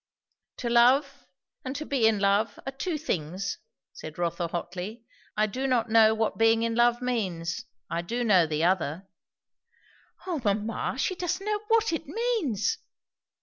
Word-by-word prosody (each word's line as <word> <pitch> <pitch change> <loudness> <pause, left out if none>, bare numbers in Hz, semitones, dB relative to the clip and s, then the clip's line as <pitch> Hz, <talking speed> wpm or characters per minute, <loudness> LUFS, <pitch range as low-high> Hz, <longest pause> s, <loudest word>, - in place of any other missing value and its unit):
"To 245 - -4
love, 270 +3 +3 0.4
and 260 +1 -5
to 305 - -4
be 260 -7 +2
in 220 -1 +3
love, 205 +2 +1
are 270 - -3
two 310 +5 -3
things," 185 - -3 0.3
said 155 0 -9
Rotha 170 0 -1
hotly. 185 +7 -5 0.3
"I 215 - +4
do 255 +6 -3
not 240 -3 +1
know 220 -1 +6
what 220 0 -1
being 225 0 +4
in 230 0 0
love 240 +1 +3
means; 185 -9 -2 0.2
I 170 - -2
do 235 +8 -2
know 190 -7 +4
the 155 +1 -1
other." 180 0 0 1.2
"O 345 -6 -2
mamma! 210 +4 -1
she 270 - 0
doesn't 365 +2 -3
know 420 0 0
what 455 -4 +3
it 325 -1 -3
means!" 445 - -1
225 Hz, 155 wpm, -27 LUFS, 190-275 Hz, 1.2 s, know